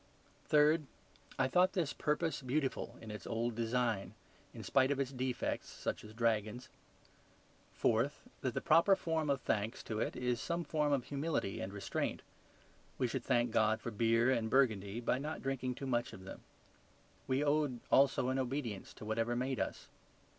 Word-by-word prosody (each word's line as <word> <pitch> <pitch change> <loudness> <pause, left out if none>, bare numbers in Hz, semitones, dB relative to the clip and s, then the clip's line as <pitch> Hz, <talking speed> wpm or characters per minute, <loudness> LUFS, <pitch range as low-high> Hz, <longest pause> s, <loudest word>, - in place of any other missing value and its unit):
Third, 150 0 +4 0.5
I 130 - +3
thought 180 +7 +4
this 170 -6 0
purpose 150 -1 0
beautiful 135 +1 -2
in 110 - -8
its 105 - -7
old 115 +1 -1
design, 115 -2 -1 0.4
in - - -9
spite 135 -1 +3
of 140 -1 0
its 135 -1 -1
defects, 130 -1 -2
such - - -4
as 105 - -10
dragons. 115 0 0 1.0
Fourth, 120 +6 +1 0.2
that 130 -4 -2
the - - 0
proper 170 +5 +5
form 160 -4 -1
of 140 -2 +1
thanks 105 +3 -1
to 110 -1 -3
it - - -1
is 125 -1 -1
some 170 0 -1
form 150 -2 0
of 140 -3 +2
humility 140 -8 -2
and 95 - -4
restraint: 100 -1 -3 0.7
we 130 - +1
should - - -3
thank 120 -2 +2
God 110 0 +3
for 120 - -5
beer 115 +3 +3
and 115 -3 +1
Burgundy 110 -4 +2
by 125 +2 +1
not 150 +3 -5
drinking 130 -2 -2
too 135 - -6
much 120 -2 0
of 95 - -10
them. 95 - -9 0.9
We 130 +2 +1
owed, 145 -4 +1
also, 135 -1 +4
an 130 +1 0
obedience 125 -6 -3
to - - -9
whatever 115 +2 0
made 130 +1 -1
us. - - -3
130 Hz, 170 wpm, -35 LUFS, 115-140 Hz, 1.0 s, proper